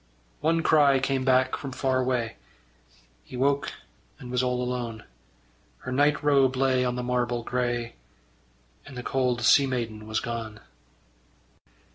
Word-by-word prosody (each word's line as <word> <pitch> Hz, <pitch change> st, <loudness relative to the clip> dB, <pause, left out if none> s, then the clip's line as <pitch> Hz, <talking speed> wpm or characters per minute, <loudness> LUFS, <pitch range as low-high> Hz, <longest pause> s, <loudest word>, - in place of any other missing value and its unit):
One 165 Hz, +1 st, +1 dB
cry 145 Hz, -4 st, +5 dB
came 135 Hz, 0 st, 0 dB
back 130 Hz, 0 st, +3 dB
from 135 Hz, -2 st, -7 dB
far 130 Hz, 0 st, 0 dB
away: 125 Hz, -, -1 dB, 0.9 s
He 125 Hz, -, -9 dB
woke, 140 Hz, +2 st, +1 dB, 0.5 s
and 125 Hz, -, -10 dB
was 125 Hz, 0 st, +1 dB
all 125 Hz, -1 st, -1 dB
alone. 120 Hz, -3 st, -4 dB, 0.8 s
Her 130 Hz, -, -6 dB
night 145 Hz, +3 st, +2 dB
robe 135 Hz, -3 st, +3 dB
lay 130 Hz, -1 st, +2 dB
on 125 Hz, -1 st, -1 dB
the 125 Hz, -, -3 dB
marble 120 Hz, -1 st, -1 dB
grey, 120 Hz, -1 st, -2 dB, 0.9 s
And 140 Hz, -3 st, -11 dB
the 125 Hz, -, -5 dB
cold 125 Hz, -2 st, 0 dB
sea 135 Hz, +3 st, +5 dB
maiden 115 Hz, -4 st, -4 dB
was 110 Hz, 0 st, -1 dB
gone. 115 Hz, -2 st, -5 dB
125 Hz, 140 wpm, -26 LUFS, 120-135 Hz, 0.9 s, cry